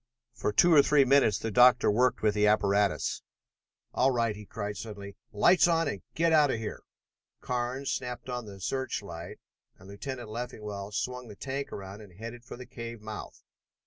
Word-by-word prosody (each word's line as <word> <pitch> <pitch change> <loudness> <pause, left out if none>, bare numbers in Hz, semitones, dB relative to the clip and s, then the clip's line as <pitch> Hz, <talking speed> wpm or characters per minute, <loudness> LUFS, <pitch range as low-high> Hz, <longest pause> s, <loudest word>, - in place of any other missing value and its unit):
For - - -2
two 170 +11 +5
or 145 - +8
three 140 -1 +4
minutes 135 -4 +4
the 115 - -4
doctor 125 0 +6
worked 125 +3 +2
with 105 -1 +3
his 105 0 +3
apparatus. 100 -1 +1 0.7
"All 130 - +3
right!" 115 -4 0
he 105 -1 -11
cried 105 -1 -5
suddenly. 100 -1 -8 0.2
"Lights 170 - +5
on 165 -2 +2
and 100 - -3
get 165 0 +2
out 150 -2 +5
of 115 - 0
here!" 110 -1 -6 0.6
Carnes 125 +2 -2
snapped 125 -1 -4
on 125 -2 -4
the 100 -1 -10
search 130 +2 -3
light 85 -2 -8 0.4
and 95 - -16
Lieutenant 120 +3 -7
Leffingwell 105 -3 -6
swung 125 +4 -3
the 105 - -10
tank 135 +5 -5
around 100 +1 -8
and 100 -4 -14
headed 115 +2 -8
for 120 - -10
the 125 - -9
cave 115 -1 -8
mouth. 105 0 -8
115 Hz, 180 wpm, -29 LUFS, 105-130 Hz, 0.7 s, or